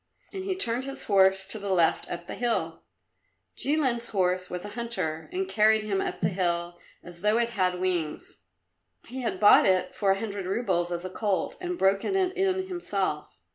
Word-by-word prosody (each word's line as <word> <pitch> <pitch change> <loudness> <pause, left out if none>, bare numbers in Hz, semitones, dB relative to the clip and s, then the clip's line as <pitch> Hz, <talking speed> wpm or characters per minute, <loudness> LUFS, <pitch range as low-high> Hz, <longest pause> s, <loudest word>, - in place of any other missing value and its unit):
And 380 -1 -5
he 385 -1 -1
turned 250 -7 +1
his 275 0 -6
horse 190 -1 +3
to 215 - -5
the 200 0 -5
left 175 -4 +2
up 175 0 -6
the - - -7
hill. 240 -1 -1 0.7
Jilin's 260 -5 +1
horse 185 -2 0
was 180 +1 -5
a - - -6
hunter 205 - -4
and 375 +1 -2
carried 215 - +3
him 200 -2 -1
up - - -4
the 175 - +2
hill 175 -2 -2 0.2
as 175 -1 -11
though 210 +2 +3
it 235 0 +1
had 185 -5 0
wings. 175 -4 -2 0.7
He 255 +2 -6
had 200 -6 -2
bought 205 0 +7
it 185 -1 +1
for 200 - 0
a 195 0 +3
hundred 200 -4 -4
roubles 185 -4 0
as 175 +1 -3
a 185 - -5
colt, 205 -1 -1
and 360 -1 -3
broken 195 - +1
it 375 -1 +1
in 375 0 0
himself. 200 - -3
200 Hz, 190 wpm, -27 LUFS, 180-235 Hz, 0.7 s, bought